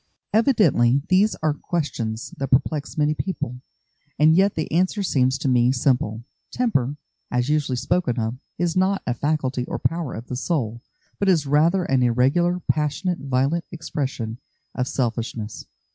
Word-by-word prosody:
Evidently 165 - +4
these 195 +4 +4
are 155 -1 +2
questions 130 -8 -3
that 135 - -1
perplex 145 +3 0
many 150 0 +2
people, 125 -8 -4 0.6
and 155 +1 +5
yet 195 +2 +3
the 160 - -3
answer 185 +5 +1
seems 130 -6 +2
to - - -3
me 125 -1 +4
simple. 125 -4 0 0.3
Temper, 145 - 0 0.3
as 125 +2 0
usually 150 -4 +1
spoken 130 +1 0
of, 110 +1 -1 0.2
is 170 -1 0
not 190 +1 +1
a 125 - 0
faculty 135 -1 -1
or - - -4
power 165 -4 -2
of 115 - -7
the 125 - -5
soul, 125 -5 -2 0.4
but 200 - +2
is 165 -6 +3
rather 160 +6 +3
an 135 -5 +1
irregular, 135 +9 +2
passionate, 155 +4 0
violent 140 +5 0
expression 135 -8 -4 0.3
of 125 0 -2
selfishness. 115 -4 -3
140 Hz, 150 wpm, -23 LUFS, 125-170 Hz, 0.6 s, and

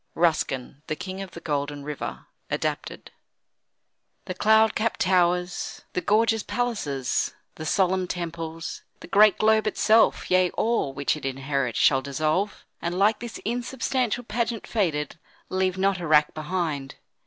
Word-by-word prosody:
RUSKIN: 145 -5 0
"The 155 - -1
King 190 +4 -6
of 195 - -6
the 170 - -10
Golden 145 -2 -3
River." 150 0 -5 0.2
(Adapted) - - -3 1.1
The 185 - -4
cloud 220 +3 +4
capp'd 230 +1 -1
towers, 180 -1 +1
the 180 - -1
gorgeous 225 +2 +3
palaces, 175 - -1 0.2
The 155 - -6
solemn 185 0 +2
temples, 165 -2 -5 0.2
the - - -9
great 210 +3 +6
globe 220 0 +3
itself, 215 0 +3
Yea, 185 0 +4
all 230 -11 +1
which 140 +2 0
it 155 - -9
inherit, 135 -2 -2
shall 135 -2 +4
dissolve; 155 +9 -1 0.2
And, 175 +1 -2
like 210 +3 +3
this 240 -1 -6
insubstantial 245 0 -1
pageant 230 0 -2
faded, 160 -8 -1 0.3
Leave 185 0 0
not 195 0 +1
a 170 - -4
rack 150 -1 +4
behind. 155 -4 -3
180 Hz, 140 wpm, -25 LUFS, 150-215 Hz, 1.1 s, great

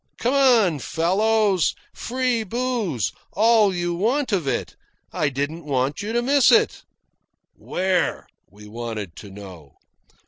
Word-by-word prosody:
"Come 245 +3 0
on, 235 - +4
fellows 195 - +1 0.2
free 250 -2 -1
booze 225 - -2 0.2
all 215 +1 +4
you 175 -1 -2
want 235 +9 0
of 180 -8 0
it. - - -2 0.4
I 150 - 0
didn't 145 +5 -4
want 135 -1 -1
you 210 +2 -4
to 240 +1 0
miss 275 0 +4
it." 450 -1 +3 0.7
"Where?" 185 0 -1 0.2
we 105 +3 -15
wanted 110 -5 -6
to 105 - -10
know. 95 -7 -12
185 Hz, 130 wpm, -22 LUFS, -, 0.7 s, on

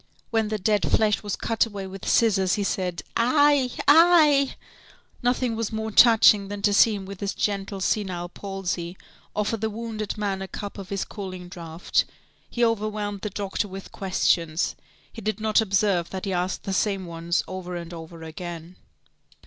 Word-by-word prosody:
When 225 -2 +1
the 215 0 -2
dead 210 +1 +1
flesh 215 -2 +2
was 205 -2 -3
cut 225 0 0
away 200 -3 -6
with 190 0 -8
scissors, 195 -5 +3
he 205 - -1
said: 180 -3 -2
"Aïe! 275 +1 +3
aïe!" 300 -3 +6 0.7
Nothing 245 -1 +1
was 225 -1 -2
more 220 0 -3
touching 215 -3 +6
than 200 0 -6
to 205 - +3
see 215 +1 +5
him 195 -1 -6
with 195 -1 -9
his 200 0 -3
gentle, 200 -1 -2
senile 185 -3 -1
palsy, 185 -2 -5 0.4
offer 210 +2 0
the 220 +1 -2
wounded 220 -1 -5
man 200 -2 -2
a 190 - -4
cup 205 +1 -7
of 190 -2 -8
his 200 -1 -2
cooling 185 -3 -7
draught. 170 -1 -1 0.4
He 240 0 +1
overwhelmed 210 -2 -2
the 210 - -3
doctor 200 +1 -3
with 195 0 -9
questions. 170 -3 0 0.4
He 225 - -8
did 215 0 -2
not 215 +1 +3
observe 195 -4 +1
that 190 +1 -5
he 195 - -2
asked 180 +1 -2
the 195 - -3
same 195 -1 0
ones 170 +1 -1
over 185 -1 -6
and 170 0 -6
over 165 0 -9
again. 170 +1 -8
200 Hz, 175 wpm, -25 LUFS, 185-220 Hz, 0.7 s, aïe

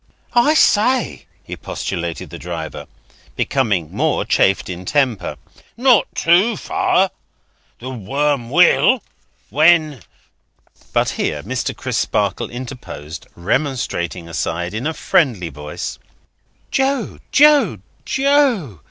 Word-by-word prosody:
"I 265 +6 +4
say!" 250 -1 +2 0.2
expostulated 85 -2 -5
the - - -8
driver, 85 -2 -6 0.5
becoming 105 - 0
more - - 0
chafed 95 - +2
in 90 0 -6
temper, 110 - 0 0.4
"not 245 -4 +4
too 185 +6 +3
fur! 190 -1 +1 0.7
The 130 +2 -7
worm 135 +2 -1
will, - - +4 0.5
when—" 155 -1 +4 0.9
But - - +2
here, - - -2
Mr. - - -3
Crisparkle - - -1
interposed, 120 - -8
remonstrating 90 - -2
aside, 85 +4 -3
in 115 +7 -2
a 160 - -3
friendly 115 - +1
voice: 75 0 -6 0.7
"Joe, 270 -2 0
Joe, 295 0 +5 0.3
Joe! 265 - +1
130 Hz, 100 wpm, -19 LUFS, -, 0.9 s, Joe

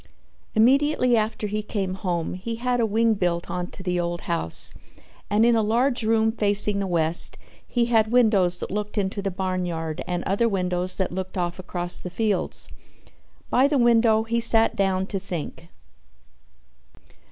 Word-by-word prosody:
Immediately 255 +2 +3
after 220 -1 -1
he 210 +1 -2
came 200 -3 -3
home 180 -3 -3
he 210 +6 -5
had 245 +1 -1
a 230 - +2
wing 225 +2 +2
built 175 -4 -2
on 180 0 -3
to 190 - -11
the 180 -1 -1
old 175 0 -3
house 165 - +1 0.6
and 210 +2 +3
in 235 0 +4
a 225 - +3
large 240 +4 +1
room 220 0 +2
facing 205 -2 +2
the 195 - -2
west 165 -1 +1 0.3
he 240 -1 +1
had 225 -2 +2
windows 205 -8 +3
that - - -5
looked 210 +2 -4
into 200 0 -1
the 195 - -2
barnyard 180 -4 -3
and 175 -1 -2
other 215 +5 +1
windows 180 -2 -1
that 190 - -2
looked 185 +1 -5
off 175 0 -2
across 175 -1 -2
the 180 - -7
fields. 205 +1 -1 0.8
By 260 +3 +4
the 290 0 +1
window 230 -2 +4
he 230 +1 -1
sat 225 -1 +2
down 190 -1 0
to 195 0 -4
think. 170 -2 -6
200 Hz, 165 wpm, -24 LUFS, 180-225 Hz, 0.8 s, in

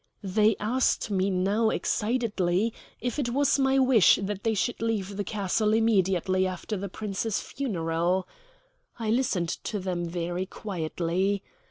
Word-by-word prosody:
They 210 +2 +3
asked 230 0 +1
me 190 0 +1
now 200 +4 +2
excitedly 215 -4 0 0.3
if 245 +4 -2
it 255 -4 0
was 280 +3 +2
my 270 0 +3
wish 255 -7 +6
that 200 0 -4
they 225 -1 +1
should 185 +1 -1
leave 205 -4 -1
the 205 - -2
castle 210 +2 0
immediately 190 -4 +2
after 185 +4 -4
the 200 0 -4
Prince's 210 +2 -2
funeral. 175 -6 -1 0.7
I 225 -2 -1
listened 220 -9 +1
to 210 - -4
them 180 -2 -2
very 175 +2 -3
quietly. 185 +1 -2
200 Hz, 140 wpm, -27 LUFS, 185-225 Hz, 0.7 s, wish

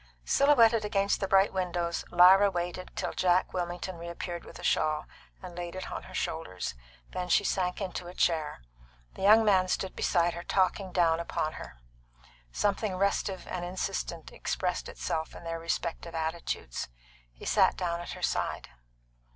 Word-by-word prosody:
Silhouetted 235 -6 +5
against 200 -1 +1
the 195 - -1
bright 195 +1 +4
windows, 175 -2 -1
Lyra 190 +3 +7
waited 180 0 -4
till - - -2
Jack 180 0 +2
Wilmington 175 0 -3
reappeared 170 0 -6
with - - -11
a - - -11
shawl 155 0 +1 0.4
and 180 -2 -8
laid 175 0 -5
it 185 - -6
on - - -4
her - - -12
shoulders. 95 - -3 0.4
Then 180 0 -4
she 190 - +4
sank 180 -2 0
into 185 -3 -4
a 180 - -9
chair. 155 - 0 0.5
The - - -10
young 215 +3 +7
man 190 -3 +4
stood 185 0 -2
beside 175 -1 +2
her 170 - -6
talking 190 +1 0
down 165 -2 +3
upon 160 -2 -2
her. - - -9 0.7
Something 205 - 0
restive 195 0 0
and 180 - -4
insistent 175 -2 -4
expressed 180 -1 -2
itself 160 -1 -3
in - - -10
their 165 0 -4
respective 165 0 -3
attitudes. 160 - -3 0.4
He - - -13
sat - - +4
down 170 -1 -1
at 175 - -6
her - - -9
side. - - -1
180 Hz, 160 wpm, -29 LUFS, 170-190 Hz, 0.7 s, Lyra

